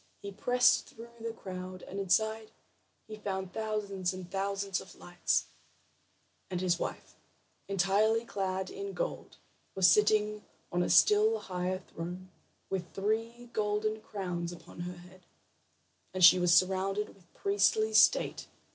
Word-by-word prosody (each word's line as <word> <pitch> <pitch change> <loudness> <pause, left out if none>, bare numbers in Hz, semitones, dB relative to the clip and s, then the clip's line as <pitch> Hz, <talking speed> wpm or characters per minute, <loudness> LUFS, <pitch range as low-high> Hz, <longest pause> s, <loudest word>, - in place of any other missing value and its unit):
He 200 - -5
pressed 245 +5 +3
through 235 -3 -12
the 230 0 -4
crowd, 185 -3 -8
and 195 - -6
inside 220 +3 +1 0.6
he 215 -1 -8
found 190 -3 -4
thousands 200 -4 -2
and 180 -1 -9
thousands 195 0 -2
of - - -14
lights, 175 0 -1 1.0
and 180 -2 -2
his 180 -1 +1
wife, - - -5 0.5
entirely 200 +4 +2
clad 190 -3 -3
in 400 0 -6
gold, - - -4 0.4
was 190 -2 +5
sitting 210 0 +3 0.3
on 175 - +1
a - - 0
still 430 +2 +5
higher 185 - -3
throne, 180 +3 -7 0.4
with 180 -3 -4
three 225 +4 -2
golden 215 +1 -1
crowns 180 -5 -4
upon 175 - -12
her 180 +1 -5
head, 180 0 -16 0.9
and 185 - 0
she 180 +1 +8
was 180 -1 +3
surrounded 190 +4 +2
with 180 -3 -21
priestly 435 +2 +2
state. - - +4
195 Hz, 135 wpm, -31 LUFS, 185-220 Hz, 1.0 s, she